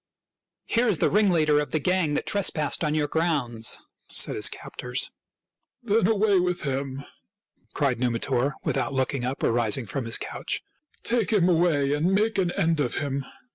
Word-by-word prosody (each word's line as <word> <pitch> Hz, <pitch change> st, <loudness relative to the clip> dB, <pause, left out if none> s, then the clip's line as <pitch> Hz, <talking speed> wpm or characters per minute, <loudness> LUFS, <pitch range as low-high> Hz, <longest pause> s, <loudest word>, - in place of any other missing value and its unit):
"Here 235 Hz, +2 st, +1 dB
is 205 Hz, -7 st, +2 dB
the -, -, +1 dB
ringleader 170 Hz, -8 st, +3 dB
of 150 Hz, -, -2 dB
the -, -, 0 dB
gang 165 Hz, -1 st, +1 dB
that -, -, -2 dB
tres 200 Hz, -2 st, +1 dB
passed 155 Hz, +1 st, -1 dB
on 150 Hz, -1 st, 0 dB
your 150 Hz, -1 st, +1 dB
grounds," 140 Hz, -, 0 dB, 0.3 s
said -, -, +1 dB
his -, -, +3 dB
captors. -, -, -4 dB, 0.3 s
" -, -, -56 dB
Then 215 Hz, -3 st, +2 dB
away 210 Hz, -3 st, +3 dB
with 180 Hz, 0 st, -1 dB
him! 135 Hz, 0 st, -3 dB, 0.3 s
" 210 Hz, -, -30 dB
cried 135 Hz, -5 st, +1 dB
Numitor, 125 Hz, +3 st, 0 dB
without 135 Hz, -1 st, -1 dB
looking 130 Hz, -1 st, -1 dB
up 130 Hz, +2 st, -3 dB
or -, -, +3 dB
rising 115 Hz, +1 st, +1 dB
from 125 Hz, +5 st, -4 dB
his 115 Hz, -, +2 dB
couch. -, -, -4 dB, 0.2 s
" 305 Hz, -, -36 dB
Take 230 Hz, -3 st, +1 dB
him 195 Hz, -5 st, +3 dB
away 160 Hz, -5 st, +2 dB
and 160 Hz, +6 st, +1 dB
make 215 Hz, +1 st, +1 dB
an 180 Hz, -2 st, +1 dB
end 165 Hz, -5 st, +1 dB
of 125 Hz, -5 st, -1 dB
him." 140 Hz, -2 st, -2 dB
150 Hz, 185 wpm, -25 LUFS, 135-185 Hz, 0.3 s, ringleader